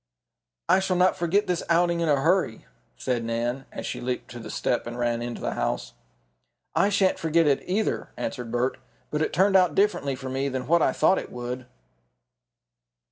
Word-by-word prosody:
"I - - +5
shall 190 -1 0
not 180 +1 +4
forget 185 +5 +1
this 180 -3 -1
outing 170 0 +3
in 165 -2 +1
a 145 -2 +4
hurry," 165 -6 +1 0.3
said 125 -2 -1
Nan, 120 +3 -2
as - - -6
she - - -4
leaped 125 0 -3
to 120 - -8
the 115 - -8
step 120 - -1
and 120 +1 -6
ran 120 -1 0
into 120 0 -5
the - - -2
house. - - -2 0.8
"I 200 - +3
shan't 200 -2 +2
forget 165 +1 +2
it 140 -2 +3
either," 205 +4 -1
answered 125 -4 -4
Bert. 125 +2 0 0.3
"But 150 - -1
it - - 0
turned 195 +2 +3
out 180 -5 +4
differently 195 -9 +1
for 130 0 -7
me 135 +1 -1
from 130 -1 -3
what 170 +5 +3
I - - +3
thought 190 - +3
it - - -8
would." 125 +1 -5
145 Hz, 190 wpm, -26 LUFS, 125-180 Hz, 0.8 s, I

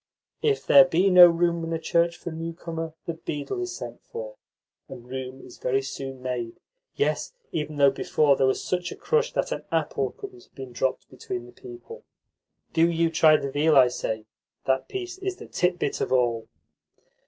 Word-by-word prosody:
"If 430 -1 +1
there 185 - +9
be 180 +3 +2
no 180 -1 +10
room 170 0 +1
in 165 - -4
a - - 0
church 170 +1 +1
for 170 - -7
a - - -7
newcomer, 165 0 -5
the 170 - -3
beadle 160 - -5
is 365 0 -4
sent - - -8
for, - - -6 0.5
and 120 0 -10
room 130 +1 -7
is - - -14
very 135 +2 0
soon 135 -1 -7
made 120 -3 -4 0.4
yes, 435 +3 -1 0.2
even 150 -1 -3
though 140 -1 +5
before 140 +1 +2
there 135 - +2
was 130 - 0
such 180 -1 -2
a - - -6
crush 470 +1 0
that - - -1
an - - -3
apple - - 0
couldn't 380 -3 -11
have - - -35
been 130 -2 -8
dropped 130 +2 -2
between 120 -1 -6
the 120 - -14
people. 120 -1 -11 0.7
Do 165 +1 +4
you 165 -1 +1
try 155 -1 +6
the 140 -2 -4
veal, 150 +2 +3
I 130 -2 +7
say. 110 -3 -4 0.4
That 130 0 +1
piece 370 -1 -5
is 385 -1 -3
the - - -11
titbit 180 -5 -1
of - - -2
all." 120 -3 +1
160 Hz, 190 wpm, -25 LUFS, 130-180 Hz, 0.7 s, no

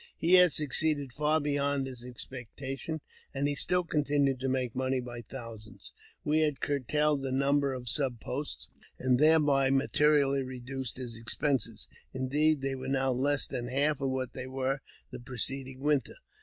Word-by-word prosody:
He 170 +3 +2
had 180 -2 +8
succeeded 145 -2 +2
far 150 +3 +2
beyond 145 -2 0
his 125 -2 -9
ex 125 -1 -1
pectation, 135 +5 -6 0.3
and 140 +1 +1
he 145 - 0
still 180 +5 +2
continued 145 -4 +1
to 135 +1 -1
make 130 -2 -1
money 130 0 0
by 120 -1 -7
thousands. 115 -3 -10 0.3
We 150 +1 +2
had 150 -5 +1
curtailed 145 +2 +1
the 135 -1 -3
number 140 +1 +2
of 125 -1 -8
sub 130 -1 0
posts, - - -4 0.3
and 125 -1 +2
thereby 145 -3 +4
materially 140 0 +3
reduced 130 -1 -5
his 120 -3 -6
expenses; 115 -1 -1 0.3
indeed, 145 +3 +2
they 135 0 -1
were 130 0 -6
now 135 0 +1
less 140 +3 +1
than 120 0 -4
half 140 +3 +1
what 130 -2 -2
they 130 -1 -6
were 135 +1 -2 0.3
the 125 - -7
preceding 130 +1 -3
winter. 145 -1 +1
135 Hz, 160 wpm, -30 LUFS, 130-145 Hz, 0.3 s, had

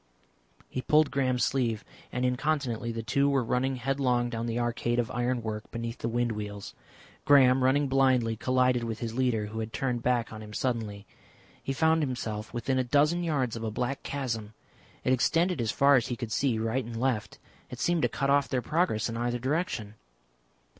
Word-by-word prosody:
He 130 - -4
pulled 150 +2 +3
Graham's 130 -3 +1
sleeve, 115 -5 0 0.3
and 125 0 -1
incontinently 125 -3 -1
the 115 0 -4
two 140 +5 +2
were 135 -2 +2
running 130 +3 0
headlong 125 -1 0
down 115 0 -3
the 115 0 -2
arcade 120 0 -1
of 120 0 0
iron 125 -1 -1
work 110 -1 -5
beneath 115 0 -5
the 115 - -2
wind 120 0 0
wheels. 105 -2 -6 0.5
Graham, 130 -2 +6
running 140 +2 +3
blindly, 130 -4 +3
collided 125 +1 +2
with 115 -1 -3
his 115 -1 -4
leader, 120 -4 +1
who 110 +2 -6
had 110 0 -4
turned 125 -2 -1
back 120 -2 0
on 110 - -8
him 105 0 -10
suddenly. 110 -5 -2 0.6
He - - -3
found 160 +3 +3
himself 115 -6 -3
within 130 +2 -1
a - - +2
dozen 150 +7 +2
yards 135 -8 0
of 115 - -5
a 110 - -1
black 125 +5 -2
chasm. 115 -6 -4 0.5
It 130 - +3
extended 165 +4 +2
as 115 - -1
far 140 +4 +5
as 120 - 0
he 120 - -2
could 120 -2 -6
see 125 0 +1
right 115 +4 -1
and 115 0 -6
left. 120 -4 -1 0.3
It - - -8
seemed 175 -2 +1
to - - +2
cut 140 0 0
off 140 -1 +3
their 125 -2 -1
progress 155 - +1
in 115 -1 -4
either 120 +1 -1
direction. 130 - -2
125 Hz, 195 wpm, -28 LUFS, 115-135 Hz, 0.6 s, Graham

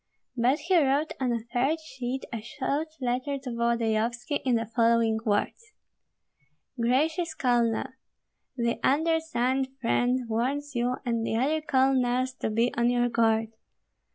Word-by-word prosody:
But 250 +4 +2
he 345 +1 +3
wrote 280 +3 +1
on 255 -2 0
a 235 - +1 0.2
third 275 +6 +1
sheet 260 -4 -5
a 230 - -3
short 275 +6 -2
letter 255 +2 -1
to 265 -2 -7
Volodyovski 235 +2 0
in 255 -3 +2
the 225 0 0
following 230 -1 +2
words, 235 - -1 1.0
Gracious 310 +8 0
Colonel, 240 -5 +1 0.7
The 235 -1 0
undersigned 285 -4 +1
friend 245 0 +1
warns 270 +6 -2
you 245 0 0
and 230 -2 0
the 225 - -1
other 300 +6 +1
colonels 260 -2 +2
to - - -1
be 230 +3 +1
on 235 +1 +2
your 245 0 +2
guard. 225 -1 +2
245 Hz, 135 wpm, -27 LUFS, 235-275 Hz, 1.0 s, he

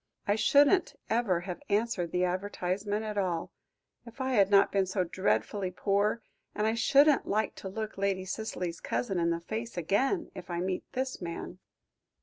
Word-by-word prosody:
"I 205 - +4
shouldn't 290 - +4 0.2
ever 215 -7 +2
have 180 -1 -6
answered 205 -5 0
the 180 - +1
advertisement 195 +3 -2
at 210 -1 -2
all, 175 -4 -1 0.5
if 235 +2 -14
I 260 0 -1
had 200 -6 +4
not 200 -1 +5
been 195 -1 +2
so 185 0 0
dreadfully 180 - 0
poor, 200 +4 0 0.3
and 210 - 0
I 220 - +2
shouldn't 280 +5 +4
like 215 0 0
to 190 - -6
look 215 +1 -5
Lady 195 -1 0
Cicely's 185 -4 -4
cousin 195 -7 -2
in 170 0 +2
the 170 0 -1
face 225 +5 -5
again 260 - 0
if 180 -1 -9
I 170 -1 -2
met 185 +1 -1
this 260 -2 -3
man." 175 +1 -6
200 Hz, 170 wpm, -30 LUFS, 180-225 Hz, 0.5 s, not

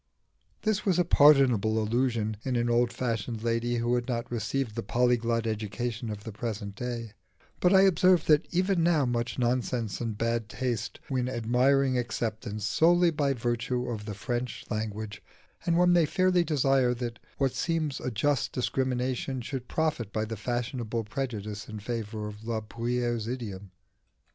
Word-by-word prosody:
This 215 -2 +1
was 185 -4 +2
a 180 - +3
pardonable 135 - +5
illusion 110 -1 0
in 130 -2 -1
an 120 0 +1
old 120 0 +3
fashioned 115 -2 -3
lady 120 +1 0
who 120 +1 0
had 120 -1 0
not 120 -2 -3
received 120 +1 -2
the - - -3
polyglot 120 +1 +1
education 110 +2 -3
of 105 -1 -6
the 110 - -6
present 105 -2 -4
day; 120 0 -5 0.5
but 180 - +4
I 190 -1 +7
observe 185 -2 +4
that 150 +1 +4
even 185 0 +1
now 165 -4 +3
much 120 -1 -1
nonsense 120 -3 -1
and 115 -3 -3
bad 115 0 -1
taste 120 -1 -3
win 125 -1 0
admiring 130 +3 +2
acceptance 110 -3 -3
solely 175 +7 +4
by 145 -3 +1
virtue 120 +1 -1
of 105 -3 -5
the 105 -2 -5
French 120 +3 -3
language, 110 -2 -4 0.5
and 170 0 +3
one 175 0 +5
may 170 -3 +4
fairly 185 +1 +3
desire 135 -5 +2
that 120 -1 -5 0.2
what 135 -2 +1
seems 160 -5 -1
a - - -3
just 130 +3 0
discrimination 130 0 -1
should 125 +1 -5
profit 155 -10 -1
by 110 0 -1
the 110 +1 -5
fashionable 120 0 -2
prejudice 105 -3 -4
in 110 -1 -6
favour 110 -1 -4
of 105 +1 -9
La 115 -1 -1
Bruyère's 120 0 -2
idiom. 105 -6 -5
120 Hz, 160 wpm, -28 LUFS, 110-135 Hz, 0.5 s, I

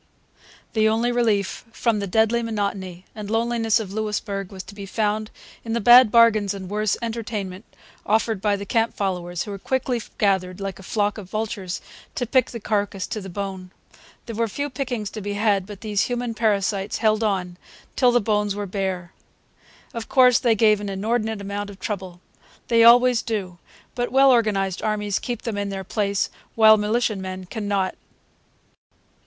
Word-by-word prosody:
The 220 -1 +3
only 230 +2 +1
relief 220 -5 0
from 225 -1 0
the 200 - -3
deadly 220 +4 +2
monotony 200 -5 -3
and 210 -2 -7
loneliness 225 0 +1
of 200 -3 -6
Louisbourg 210 -2 -3
was 190 -1 -7
to 195 - -12
be 200 -1 -8
found 215 +1 -1 0.3
in 225 - -4
the 235 - +1
bad 240 +2 +8
bargains 215 -4 +4
and 190 -1 -8
worse 210 -1 0
entertainment 215 -4 -4 0.4
offered 220 -1 +1
by 205 0 +2
the 200 0 -6
camp 225 +3 0
followers, 180 -3 -2
who 205 -2 -6
quickly 255 +1 -1 0.2
gathered, 190 -2 +1
like 195 -2 -5
a - - -10
flock 205 +2 -1
of 190 -3 -10
vultures, 210 -4 -3 0.3
to 245 - -1
pick 255 +2 +2
the 235 - -6
carcass 205 -2 -1
to 215 - -5
the 190 - -8
bone. 190 -1 -5 0.6
There 230 - -6
were 230 +1 +1
few 285 +7 -4
pickings 245 -6 -3
to 215 - -6
be 205 +1 -3
had, 205 -2 +1
but 205 -1 -10
these 210 -3 0
human 245 -1 -2
parasites 205 -3 0
held 215 0 +2
on 185 -4 -1 0.3
until 250 -2 +3
the 245 - +4
bones 210 -2 0
were 205 0 -3
bare. 190 -2 -3 0.8
Of 230 -1 -6
course, 250 -2 +6
they 235 -3 +3
gave 215 -1 +4
an 205 - -4
inordinate 220 +2 -1
amount 200 +1 -4
of 195 -1 -12
trouble. 185 -4 -5 0.5
They 230 -1 +5
always 245 0 +6
do. 190 -7 -4 0.3
But 245 0 -2
well 270 +1 +6
organized 200 -6 +1
armies 210 -2 -1
keep 240 -2 -5
them 220 -4 -3
in 200 0 -2
their 195 -1 -4
place; 200 0 -1 0.2
while 220 -1 +8
militiamen 205 -4 -1
can 205 +3 -5
not. 195 -2 0
210 Hz, 175 wpm, -23 LUFS, 195-230 Hz, 0.8 s, bad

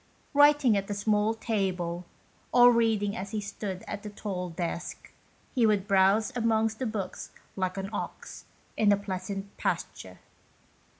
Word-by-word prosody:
Writing 290 -5 +5
at 195 0 -2
a 205 - -2
small 210 +2 +1
table, 185 -6 -2 0.5
or 245 0 +8
reading 220 -3 +1
as 200 -3 -5
he 215 0 -2
stood 200 -2 -5
at 205 - -5
a 210 - -6
tall 190 -3 -4
desk, 170 +1 -5 0.4
he 245 - +2
would 205 -3 +2
browse 200 +5 +3
amongst 225 -2 +1
the 255 - -1
books 205 -4 -5 0.3
like 185 0 -2
an 195 0 -3
ox - - -6 0.3
in 210 -2 +4
a 205 - +4
pleasant 195 0 -5
pasture. - - -3
205 Hz, 145 wpm, -28 LUFS, 190-225 Hz, 0.5 s, or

